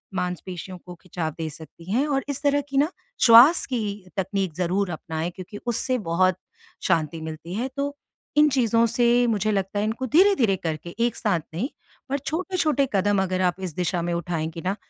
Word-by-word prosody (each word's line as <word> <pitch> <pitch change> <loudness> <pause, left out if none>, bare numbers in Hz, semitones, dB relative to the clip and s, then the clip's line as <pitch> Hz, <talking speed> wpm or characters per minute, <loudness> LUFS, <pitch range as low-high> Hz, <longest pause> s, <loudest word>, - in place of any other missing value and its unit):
मांसपेशियों 180 0 -4
को 180 - -8
खिंचाव 170 -2 -4
दे 160 -1 -3
सकती 160 +3 -11
हैं। 255 +7 +2
और 275 -2 0
इस 285 -1 -2
तरह 285 0 +3
की 275 - -2
ना 295 +5 +3 0.3
श्वास 245 +8 +8
की 255 -3 -1 0.4
तकनीक 190 -2 -1
ज़रूर 185 +3 0
अपनाएँ 160 +1 -4
क्योंकि 190 +2 -8
उससे 245 +2 0
बहुत 185 +2 +3 0.5
शांति 165 -3 0
मिलती 160 +2 -7
है। 240 +5 -1
तो 285 +1 -2 0.4
इन 300 0 +6
चीज़ों 235 -4 +3
से 240 +1 +3
मुझे 215 -2 +1
लगता 195 0 -1
है 205 - +1
इनको 225 +4 -2
धीरे-धीरे 300 - +4
करके 165 +1 -4
एक 235 - -5
साथ 200 -7 0
नहीं 210 - -2 0.4
और 280 - 0
छोटे-छोटे 310 -2 0
कदम 200 0 +2
अगर 185 0 -1
आप 180 -1 +2
इस 155 - -16
दिशा 180 0 -1
में 175 0 -1
उठाएँगी 165 -1 -3
ना 190 +2 0
195 Hz, 180 wpm, -24 LUFS, 175-255 Hz, 0.5 s, श्वास